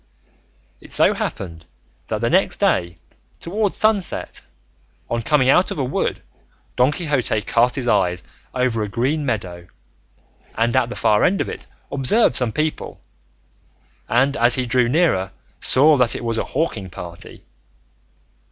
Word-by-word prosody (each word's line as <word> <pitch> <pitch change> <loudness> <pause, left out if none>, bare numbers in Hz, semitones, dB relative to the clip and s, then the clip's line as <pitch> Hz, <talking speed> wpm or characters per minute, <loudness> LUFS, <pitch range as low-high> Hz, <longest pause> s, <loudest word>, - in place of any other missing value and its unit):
It - - -15
so - - +5
happened 85 -3 -6 0.4
that - - -3
the - - +1
next - - +2
day 85 -1 0 0.4
towards 205 +3 -2
sunset, 215 -4 -1 0.7
on 115 - 0
coming 130 +2 +2
out 180 +7 +4
of - - -5
a 140 - -1
wood, 130 - -2 0.5
Don 125 +3 +3
Quixote 145 -9 -1
cast 120 +2 +2
his 130 -3 -2
eyes 90 -5 +1 0.3
over 125 -3 -1
a 105 - -2
green 140 +7 -1
meadow, 90 -7 -4 0.9
and 115 +2 0
at 125 -2 +2
the 125 - -6
far 105 -1 +2
end 195 - +2
of - - -2
it - - -8 0.2
observed 140 - +2
some 125 -1 +1
people, 155 +5 -3 1.1
and 135 +4 +2
as 120 +1 +4
he 130 - -1
drew 125 0 +2
nearer 120 - +1 0.3
saw 150 +4 +4
that 125 -4 +2
it - - -5
was 115 -1 -1
a - - -2
hawking 120 - -3
party. 85 -4 -10
125 Hz, 150 wpm, -20 LUFS, 110-145 Hz, 1.1 s, so